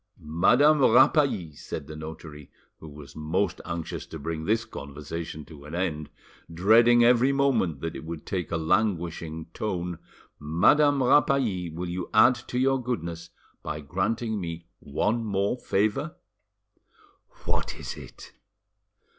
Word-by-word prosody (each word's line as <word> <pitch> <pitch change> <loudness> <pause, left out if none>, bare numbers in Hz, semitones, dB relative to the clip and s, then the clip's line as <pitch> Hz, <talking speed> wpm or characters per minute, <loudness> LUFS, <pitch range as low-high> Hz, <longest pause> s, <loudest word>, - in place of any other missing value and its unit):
"Madame 120 - +3
Rapally," 130 - +4
said 75 - -7
the 75 +2 -9
notary, 75 -1 -9 0.3
who 80 - -11
was 75 -1 -12
most 85 +4 -1
anxious 85 -2 -5
to 80 - -8
bring 80 +1 -4
this 115 +3 +1
conversation 75 +2 -7
to 75 -3 -13
an 75 +3 -8
end, 80 -5 -2 0.4
dreading 115 +7 +5
every 120 +2 +5
moment 125 - +1
that 80 0 -4
it - - -7
would 80 -1 -7
take 90 -3 -3
a 85 - 0
languishing 85 -3 -1
tone, 90 -5 -3 0.4
"Madame 140 - +3
Rapally, 125 -9 +2
will 85 +3 -5
you 90 +1 -4
add 120 +4 +7
to 125 0 -6
your 135 +1 +2
goodness 85 -9 -4 0.3
by 75 - -4
granting 105 - -2
me 85 -1 -6
one 110 +11 -1
more 100 0 0
favour?" 110 - 0 1.3
"What - - -2
is - - -7
it?" - - -12
90 Hz, 135 wpm, -26 LUFS, 80-120 Hz, 1.3 s, add